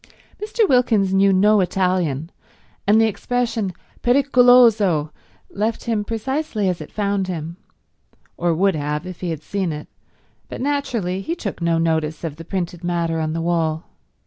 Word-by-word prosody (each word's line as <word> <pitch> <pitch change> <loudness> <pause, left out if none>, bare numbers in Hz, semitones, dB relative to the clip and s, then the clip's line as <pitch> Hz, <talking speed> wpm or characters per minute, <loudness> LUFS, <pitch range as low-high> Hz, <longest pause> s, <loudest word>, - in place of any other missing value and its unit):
Mr. 430 0 +1
Wilkins 220 - +3
knew 195 0 +4
no 205 +3 +4
Italian, 180 -5 0 0.6
and 210 +2 +5
the 225 - +5
expression 225 -1 -1 0.3
pericoloso 245 - +4 0.4
left 220 +3 -2
him 225 -3 -1
precisely 230 0 -2
as 180 -1 -1
it - - -9
found 200 -2 -1
him—or 170 0 -7
would 195 +3 +2
have 150 +1 -3
if 185 -1 -9
he 180 - -2
had 160 -2 -5
seen 190 -2 -2
it, 150 0 -7 0.6
but - - -7
naturally 250 -10 -1
he 330 - -3
took 205 - -6
no 170 -1 +2
notice 160 -1 -1
of 155 -3 -4
the 165 - -8
printed 175 -1 -4
matter 170 -2 -1
on 155 0 -1
the 165 - -2
wall. 165 -1 0
190 Hz, 150 wpm, -21 LUFS, 165-225 Hz, 0.6 s, and